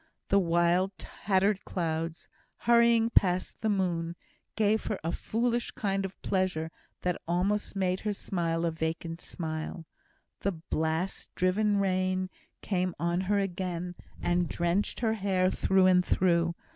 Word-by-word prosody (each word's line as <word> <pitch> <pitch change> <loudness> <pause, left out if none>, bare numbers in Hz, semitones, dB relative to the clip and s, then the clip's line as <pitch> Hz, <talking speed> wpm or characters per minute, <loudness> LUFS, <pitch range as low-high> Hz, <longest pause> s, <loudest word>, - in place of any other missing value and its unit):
The 200 - +5
wild 175 +2 +2
tattered 195 0 0
clouds, 165 -1 -3 0.4
hurrying 235 -1 +5
past 185 -3 +2
the 220 - +1
moon, 175 -4 0 0.4
gave 215 0 +2
her 210 - -1
a 165 - 0
foolish 235 +5 -1
kind 195 -1 -1
of 195 - -8
pleasure 180 -4 0 0.3
that 180 -1 -1
almost 195 +5 0
made 185 -1 +1
her 210 -1 -1
smile 170 -4 -1
a 165 - +1
vacant 165 +1 -3
smile. 160 0 -5 0.5
The 200 - 0
blast 160 +2 -2
driven 205 +3 +2
rain 185 -1 0 0.3
came 185 -3 0
on 170 +3 0
her 205 - +3
again, 180 -2 -2 0.3
and 175 -1 +1
drenched 175 +7 0
her 225 -2 +2
hair 190 -3 +1
through 190 -1 +3
and 180 -1 +5
through. 170 -2 +2
185 Hz, 135 wpm, -29 LUFS, 170-200 Hz, 0.5 s, The